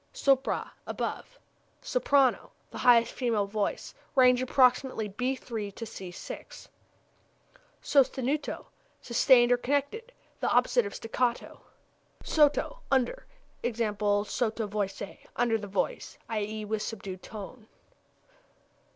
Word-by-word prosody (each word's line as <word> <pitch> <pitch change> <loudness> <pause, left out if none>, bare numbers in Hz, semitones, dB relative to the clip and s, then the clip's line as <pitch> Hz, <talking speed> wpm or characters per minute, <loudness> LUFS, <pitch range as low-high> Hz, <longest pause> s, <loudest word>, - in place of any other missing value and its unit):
Sopra 270 -1 +1 0.2
above. - - -4 0.5
Soprano 280 - +2 0.2
the - - -7
highest 235 -2 +5
female 230 -5 0
voice. 205 0 -3 0.2
Range 250 -1 +5
approximately 255 -3 +2
b 250 +7 -1
c'''. 205 -6 -7 1.2
Sostenuto 275 +1 +1 0.3
sustained 240 0 +4
or 245 - +5
connected; 285 - -2 0.3
the - - 0
opposite 485 -3 +3
of - - -8
staccato. 240 +1 -2 0.6
Sotto 310 - +2
under. 275 - 0 0.3
E.g., 240 -2 -2 0.5
sotto 225 0 -1
voce 200 -1 -5
under 235 -2 +1
the 205 - -7
voice, 195 -1 -3
i.e., 215 -1 -3
with 215 0 -2
subdued 195 -4 -6
tone. 215 +2 -9
240 Hz, 100 wpm, -29 LUFS, 215-265 Hz, 1.2 s, highest